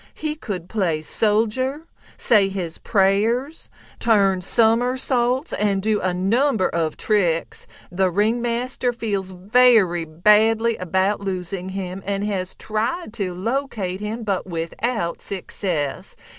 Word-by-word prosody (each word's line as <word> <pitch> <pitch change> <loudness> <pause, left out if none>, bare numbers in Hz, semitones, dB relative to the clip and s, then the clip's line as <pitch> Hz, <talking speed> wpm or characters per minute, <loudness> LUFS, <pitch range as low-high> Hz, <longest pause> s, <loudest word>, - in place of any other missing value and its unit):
He 305 -1 -3
could 200 - -6
play 175 -7 -1
soldier, 230 - 0 0.3
say 205 -4 +3
his 180 -4 -5
prayers, 225 +9 +1 0.3
turn 200 -5 +3
somersaults, 245 - +2
and 200 -2 +1
do 210 +1 0
a 185 - 0
number 210 +4 +1
of 160 -2 -2
tricks. 175 -6 0 0.2
The 185 +1 +1
ringmaster 240 +5 0
feels 205 -5 -3
very 190 -2 +3
badly 215 +7 +3
about 190 +3 0
losing 185 -1 -4
him, 190 0 -5
and 200 0 -2
has 190 -3 -3
tried 220 +6 -3
to 190 -6 -3
locate 210 -3 -2
him, 220 +3 -4
but 195 -3 -2
without 170 +3 -3
success. 180 -6 -3
205 Hz, 115 wpm, -22 LUFS, 185-235 Hz, 0.3 s, say